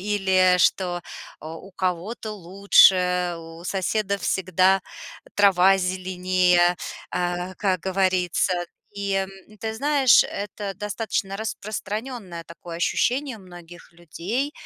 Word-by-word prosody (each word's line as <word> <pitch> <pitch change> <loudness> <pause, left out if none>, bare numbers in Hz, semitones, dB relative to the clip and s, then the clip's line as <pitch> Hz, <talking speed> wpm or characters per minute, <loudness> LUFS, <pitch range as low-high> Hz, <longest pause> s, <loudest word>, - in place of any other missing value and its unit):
или 190 -2 +3
что, 175 -1 +1 0.4
э, - - -8
у 165 +5 -10
кого-то 185 +5 -3
лучше, 180 -2 +4
у 165 +1 -11
соседа 200 +2 -1
всегда 185 +1 +2 0.5
трава 195 -1 +5
зеленее, 180 -1 +2 0.3
а, 180 +1 -2
как 190 -4 0
говорится. 185 -1 +1 0.4
И, 200 -1 -3
м, 195 0 -1 0.3
ты 220 +1 -3
знаешь, 275 0 +5
это 200 0 -5
достаточно 205 -1 -3
распространенное 215 -3 -5
такое 170 0 -10
ощущение 250 +7 0
многих 175 -2 -13
людей. 190 - -4
185 Hz, 100 wpm, -24 LUFS, 180-205 Hz, 0.5 s, трава